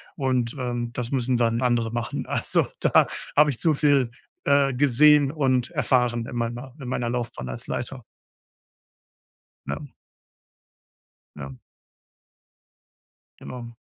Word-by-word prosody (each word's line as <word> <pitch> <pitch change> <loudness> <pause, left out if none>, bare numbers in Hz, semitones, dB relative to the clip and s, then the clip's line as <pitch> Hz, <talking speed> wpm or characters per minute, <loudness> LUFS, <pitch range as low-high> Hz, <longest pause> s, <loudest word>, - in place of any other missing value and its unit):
Und, 130 -3 -1
ähm, 120 -2 -3
das 125 -1 -4
müssen 125 -2 +1
dann 115 0 +1
andere 120 -3 +1
machen. 120 0 -3
Also, - - 0
da - - +4 0.3
habe 150 0 +5
ich 115 - -5
zu 160 -2 +2
viel, 140 -4 +3 0.4
äh, 140 -1 +3
gesehen 145 +2 +5
und 130 -5 +1
erfahren 125 -7 +1
in 120 - -8
meiner 120 +2 -4
in 125 - -7
meiner 120 -2 -1
Laufbahn 120 - -4
als - - -7
Leiter. 125 0 -4 1.7
Ja. 70 - -4 1.5
Mhm. 70 -3 -8 1.8
Genau. 120 -2 -9
125 Hz, 115 wpm, -24 LUFS, 120-135 Hz, 1.8 s, habe